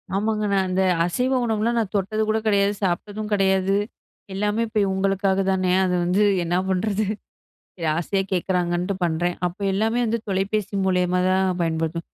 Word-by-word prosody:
ஆமாங்க 215 +1 0
நான் 190 -1 +2
அந்த 185 +1 +1 0.2
அசைவ 250 +9 0
உணவுலாம் 225 +1 0
நான் 210 -3 -3
தொட்டது 205 +2 0
கூட 220 - +2
கிடையாது, 200 -1 +3
சாப்பிட்டதும் 205 +4 -2
கிடையாது. 190 -1 +2 0.6
எல்லாமே 210 +3 0
இப்ப 215 -1 -1
இவுங்களுக்காக 195 0 0
தானே! 185 -1 +1
அது 180 -1 0
வந்து 180 +4 +1 0.2
என்னா 175 +1 0
பண்ணுறது, 200 +3 0 0.7
சரி 165 -3 -4
ஆசையா 190 +3 0
கேக்கறாங்கன்ட்டு 180 0 0
பண்றேன். 175 +2 0
அப்ப 175 +2 -5
எல்லாமே 220 +5 +1
வந்து 230 +1 -1
தொலைபேசி 200 +1 -1
மூலியமா 180 -1 +1
தான் 185 -1 +1
பயன்படுத்து 165 0 -1
190 Hz, 150 wpm, -23 LUFS, 180-210 Hz, 0.7 s, கிடையாது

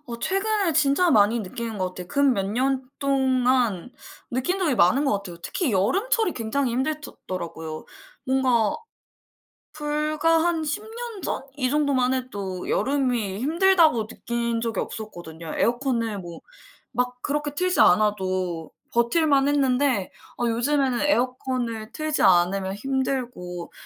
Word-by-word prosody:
어. 235 -2 -6
최근에 390 - 0
진짜 305 +4 +3
많이 220 -1 +4
느끼는 225 +2 -5
것 185 -1 -1
같아요. 180 - -7
근 280 +3 +3
몇 195 - -1
년 260 +5 0
동안 255 - +1 0.4
느낀 260 +10 -1
적이 335 -8 +1
많은 245 +8 +4
것 - - +2
같아요. 195 -4 -4
특히 275 - -2
여름철이 375 - +2
굉장히 245 +3 -1
힘들드 300 +4 -2
더라고요. 160 -3 -5 0.4
뭔가 255 -5 +2 1.0
불과 305 +2 +1
한 340 -2 +1
10 305 +6 -2
년 455 -1 -7
전 - - -2
이 255 -3 0
정도만 275 -3 +2
해도 200 -8 -4
여름이 250 -8 0
힘들다고 320 - +3
느낀 235 0 -2
적이 225 -4 -2
없었거든요. 170 -7 -7
에어컨을 235 -3 0
뭐 175 -2 -9 0.5
막 250 +1 -2
그렇게 295 0 -2
틀지 365 +4 0
않아도 185 -4 +2 0.2
버틸 235 +8 +2
만했는데 275 -5 +2 0.3
어 240 - +1
요즘에는 255 +2 +1
에어컨을 250 -5 -1
틀지 310 +3 -1
않으면 190 +1 +3
힘들고. 245 -7 -3
250 Hz, 280 characters per minute, -24 LUFS, 210-290 Hz, 1.0 s, 많이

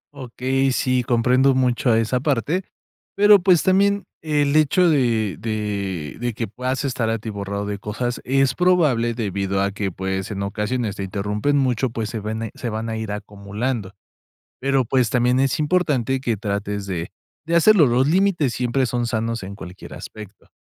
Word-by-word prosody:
Okey, 130 +1 -1
sí, 130 0 +1
comprendo 125 +2 +3
mucho 125 -1 +1
a 110 - +4
esa 115 +3 +1
parte, 145 - 0 0.5
pero, 205 0 +7
pues, 180 -2 +4
también 200 +2 +3 0.2
el 150 -2 +1
hecho 170 +4 +4
de 115 - +1
de 100 -7 -3
de 120 0 -2
que 115 0 -3
puedas 130 +6 -3
estar 120 -4 -1
atiborrado 100 -2 -3
de 100 -1 -4
cosas, 120 +4 -3
es 135 +1 +2
probable 150 -11 +2
debido 100 -3 -2
a 100 - 0
que, 100 -1 -3
pues, 95 +2 -3
en 100 -1 -4
ocasiones 105 +2 -2
te 100 - -3
interrumpen 105 +8 -1
mucho, 130 -2 +1
pues, 110 -2 -4
se 115 - -4
vene 110 +1 -4
se 120 - -5
van 110 +1 -4
a 110 - -3
ir 110 -2 -4
acumulando. 105 +1 -4 0.7
Pero, 135 0 +1
pues, 125 -1 +1
también 125 +1 +2
es 135 +1 +1
importante 150 -6 +1
que 120 -5 -1
trates 100 -1 -3
de 85 -3 -4 0.3
de 170 +1 0
hacerlo, 175 -1 +6
los 125 +2 +2
límites 175 -5 +2
siempre 125 +2 0
son 120 0 -1
sanos 115 -2 -2
en 95 - -7
cualquier 90 -2 -10
aspecto. 105 -2 -11
120 Hz, 170 wpm, -22 LUFS, 105-135 Hz, 0.7 s, pero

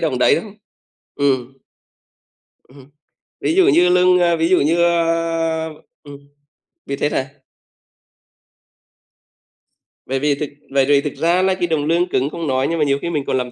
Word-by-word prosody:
đồng - - -1
đấy 440 - +4
đâu. - - -4 0.7
Ừm. 135 -3 0 1.2
Ừm 130 - -21
hưm. 135 +1 -16 0.5
Ví 325 - 0
dụ 380 -1 +4
như 180 - +4
lương, 180 0 +4
a 170 -1 +2
ví 165 +1 0
dụ 185 - +3
như, 165 +4 +1
a 165 -1 0 0.3
ừm, 140 -1 -13 0.6
biết 140 0 -5
hết 145 - +1
hả? 130 0 -2 2.8
Bởi 135 +1 -2
vì 145 0 +1
thực 145 0 -5 0.2
bởi 135 -1 +2
vì 140 0 +3
thực 150 - -5
ra 175 +2 +1
nay 190 0 +1
cái 175 -2 -2
đồng 155 -3 -1
lương 170 +3 +1
cứng 135 +3 0
không 165 -1 -6
nói 130 0 0
nhưng 165 -1 -2
mà 150 - +2
nhiều 140 0 +1
khi 170 - -3
mình 150 -4 -2
còn 130 - -1
làm 125 -1 -4
160 Hz, 180 wpm, -18 LUFS, 140-170 Hz, 2.8 s, đấy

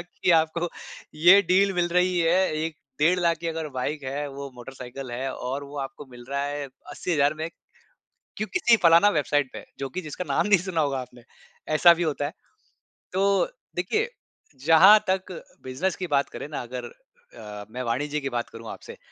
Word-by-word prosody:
कि 175 +1 -2
आपको 165 +2 0 0.5
ये 175 +6 +7
डील 195 +2 +4
मिल 175 -1 +1
रही 180 +1 +2
है 170 +2 +3 0.2
1 160 -1 -3 0.2
डेढ़ 170 +5 +3
लाख 170 -1 +2
की 170 - -5
अगर 160 -1 -3
बाइक 140 +3 -3
है 140 +2 -3
वो 140 0 -7
मोटरसाइकिल 125 +1 -9
है 130 +2 -3
और 135 +3 -4
वो 140 +1 -11
आपको 135 +1 -6
मिल 120 -1 -12
रहा 140 0 -1
है 145 0 -3 0.3
80000 150 -3 +1
में, 160 +1 -4 0.9
क्यों 215 - -2
किसी 240 -11 +4
फलाना 170 +4 +7
वेबसाइट 145 -5 0
पे। - - -8 0.2
जो 135 - -3
कि 185 - -4
जिसका 155 +2 -6
नाम - - +1
नहीं 200 -4 +5
सुना 180 -3 -1
होगा 140 -2 0
आपने, 125 -1 -10 0.5
ऐसा 170 +3 +7
भी 170 +1 -2
होता 150 -3 -1
है। 145 - -3 0.8
तो 195 -1 +3 0.3
देखिए 430 - 0 0.6
जहाँ 185 +7 +8
तक 190 0 0 0.3
बिज़नेस 140 +9 -2
की 185 - -4
बात 140 -3 +1
करें - - -7
ना 150 - -4
अगर 125 0 -6
अ, 105 -3 -12
मैं 125 +2 -5
वाणिज्य 145 +5 -1
की 135 -1 -3
बात 120 -2 -3
करूँ 115 -1 -10
आपसे। - - -10
150 Hz, 185 wpm, -25 LUFS, 135-180 Hz, 0.9 s, जहाँ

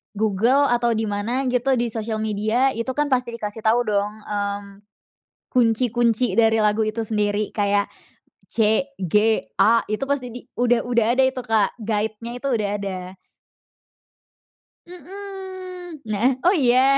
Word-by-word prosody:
Google 220 +7 +2
atau 240 -1 +2
di 220 - -1
mana 220 +6 -1
gitu, 255 +2 +2
di 240 -1 -1
sosial 220 0 -3
media 220 +5 +1
itu 230 +1 -3
kan 295 -1 0
pasti 250 -2 0
dikasih 210 -1 -5
tahu 225 +2 +4
dong, 205 -2 0
mmm, 200 -1 -4 0.7
kunci-kunci 240 0 +2
dari 225 -1 +4
lagu 215 +1 +2
itu 215 +1 -2
sendiri, 210 -1 0
kayak 200 -1 +1 0.6
C-G-A 220 - +2
itu 215 +5 -1
pasti 280 -3 -1
di 245 +2 -9 0.2
udah 245 -1 +3
udah 235 -2 +2
ada 265 - +5
itu 260 -1 -3
Kak, 220 -4 +1
guide-nya 220 +1 -3
itu 275 - -4
udah 215 -4 0
ada. 185 -2 -6 1.7
Mhm. 370 -1 -8
Nah, 215 +2 +1 0.2
oh 360 +3 +5
iya? 265 -1 +4
230 Hz, 135 wpm, -22 LUFS, 210-255 Hz, 1.7 s, ada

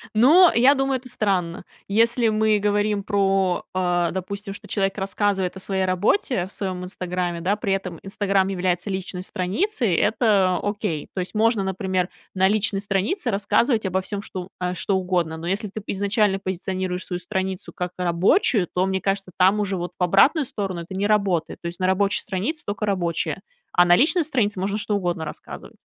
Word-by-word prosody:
Но, 315 +11 +7
я 255 +5 +6
думаю, 270 -1 0
это 255 0 -12
странно. 185 -7 -1 0.2
Если 230 +3 +3
мы 215 0 +2
говорим 205 0 0
про, 195 -3 +1
а, 175 -2 +1
допустим, 195 +3 -5
что - - -11
человек 195 -1 -1
рассказывает 195 -1 -1
о - - -7
своей 190 0 -1
работе 185 - +1
в - - -15
своем 185 -3 -3
"Инстаграме", 180 -1 -3
да, 190 +4 +1
при 205 -2 -3
этом 185 -3 -4
"Инстаграм" 195 -1 0
является 180 0 -1
личной 190 -1 -4
страницей, 200 - -1
это 200 -2 +2
окей. 205 -7 -2
То - - -4
есть 185 +4 -5
можно, 220 -1 +2
например, 190 -1 -1 0.2
на 190 0 +3
личной 205 -1 +1
странице 205 - -1
рассказывать 215 +3 +1
обо 190 0 0
всём, 200 +1 -5
что 185 0 -7
а, 180 0 -2
что 190 +2 0
угодно. 175 -3 -1
Но 165 - -8
если 195 +4 -1
ты 205 +1 -8
изначально 200 0 +1
позиционируешь 185 -1 -3
свою 180 -1 -4
страницу 190 0 -4
как 180 -1 -4
рабочую, 180 - +3
то, 185 +1 +1
мне 190 0 0
кажется, 195 0 -1
там 190 +3 +4
уже 200 -2 -1
вот 175 0 -4
в - - +1
обратную 265 - +4
сторону 195 -7 -4
это 175 +3 -8
не 200 - +1
работает. 200 -6 0
То 170 - -4
есть 175 +2 -6
на 185 - 0
рабочей 195 +2 +2
странице 220 - -3
только 205 +1 -3
рабочая, 175 -4 -1 0.3
а 175 - +5
на 175 0 +6
личной 310 - +3
странице 225 -10 0
можно 200 +3 -1
что 210 0 -1
угодно 175 -4 -2
рассказывать. 150 - -9
195 Hz, 185 wpm, -23 LUFS, 180-210 Hz, 0.3 s, Но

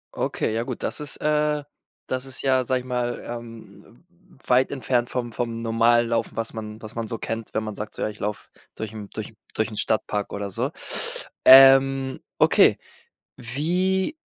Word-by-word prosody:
Okay, 110 - -1
ja 115 - 0
gut. - - -6
Das - - -2
ist, 150 -2 -4
äh 150 -1 +1 0.4
das 130 0 -2
ist 135 -1 -3
ja, 130 -1 +3
sage 130 +1 +1
ich - - -14
mal, 125 -1 -2
ähm, 115 - -10 0.4
weit 125 +1 +3
entfernt 125 -2 0
vom 120 -2 -3
vom 115 0 -3
normalen 115 +1 +3
Laufen, 115 -1 -1
was 115 0 -3
man 110 -1 -7
was 110 - -9
man 115 -1 -3
so 115 - -4
kennt, 115 0 -5
wenn 110 - 0
man 105 -1 -5
sagt: 105 0 -7
„So, - - -7
ja, - - 0
ich 105 - -11
laufe 105 0 -4 0.3
durch 110 -1 -5
'n 105 -2 -8
durch 110 0 -6 0.2
durch 110 0 0
'n 105 - -8
Stadtpark 105 -2 -1
oder 100 -1 -4
so.” - - -1 0.8
Ähm, 135 0 +7 0.2
okay, - - +5 0.6
wie 180 - -1
120 Hz, 180 wpm, -24 LUFS, 110-135 Hz, 0.8 s, Ähm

